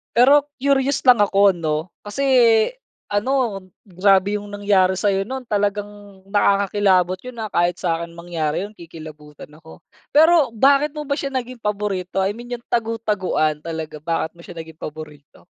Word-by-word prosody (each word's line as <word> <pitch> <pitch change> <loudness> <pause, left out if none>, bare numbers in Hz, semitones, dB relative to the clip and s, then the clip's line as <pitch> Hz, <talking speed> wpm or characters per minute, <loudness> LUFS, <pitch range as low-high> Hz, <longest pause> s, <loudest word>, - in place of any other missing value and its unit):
Pero 280 +4 +5 0.2
curious 275 0 +1
lang 250 -3 +6
ako 200 -1 +4
'no. 155 +2 -2 0.2
Kasi, 205 +7 -4 0.9
ano, 225 0 0 0.2
grabe 195 +1 +2
yung 205 - -10
nangyari 200 -2 +1
sa'yo 195 0 0
nun, 265 +2 -5
talagang 205 -2 -4
nakakakilabot 195 -2 +2
yun 245 +1 -8
ah, 215 - -5
kahit 175 -1 +1
s'kin 170 0 -2
mangyari 170 -1 -3
yun 205 - -6
kikilabutan 155 -3 -12
ako. 160 +1 -16 0.3
Pero 315 -5 +5
bakit 280 +5 +3
mo 300 - -5
ba 285 0 -3
siya 275 -1 -4
naging 250 -1 -4
paborito? 200 -3 -2
I 195 - +1
mean 240 +3 -7
yung 235 - -9
tagu-taguan, 210 -9 -1
talaga 160 -1 -6
bakit 165 +1 -3
mo - - -13
siya 180 - -10
naging 160 -1 -10
paborito? 150 -2 -10
200 Hz, 150 wpm, -21 LUFS, 170-235 Hz, 0.9 s, lang